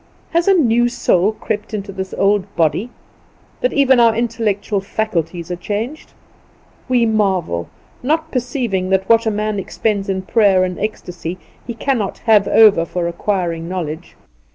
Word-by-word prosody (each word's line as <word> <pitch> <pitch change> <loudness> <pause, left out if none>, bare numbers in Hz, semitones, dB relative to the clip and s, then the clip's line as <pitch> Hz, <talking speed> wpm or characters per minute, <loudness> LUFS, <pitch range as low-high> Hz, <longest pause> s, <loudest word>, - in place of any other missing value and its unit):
Has 335 +2 +1
a 390 - +6
new 240 -6 +3
soul 200 -3 +1
crept 215 0 -4
into 200 -1 -5
this 190 -1 -5
old 200 -1 +2
body, 165 - +1 0.7
that - - +1
even 265 -3 +4
our 230 -2 +5
intellectual 220 -3 -1
faculties 180 -4 -3
are - - -1
changed? 215 - -5 0.8
We 245 -2 +3
marvel; 190 - 0 0.3
not 315 +4 -1
perceiving 240 -7 -2
that 190 0 +1
what 230 0 +4
a - - +4
man 210 -1 -2
expends 200 +1 -2
in 190 -1 -1
prayer 195 -3 +3
and 180 -1 -3
ecstasy 180 -4 -5 0.3
he 235 - -5
cannot 235 -5 -1
have 215 -3 +5
over 210 -6 +6
for 170 +1 -3
acquiring 170 -2 -2
knowledge. 160 -4 -5
205 Hz, 150 wpm, -18 LUFS, 185-230 Hz, 0.8 s, a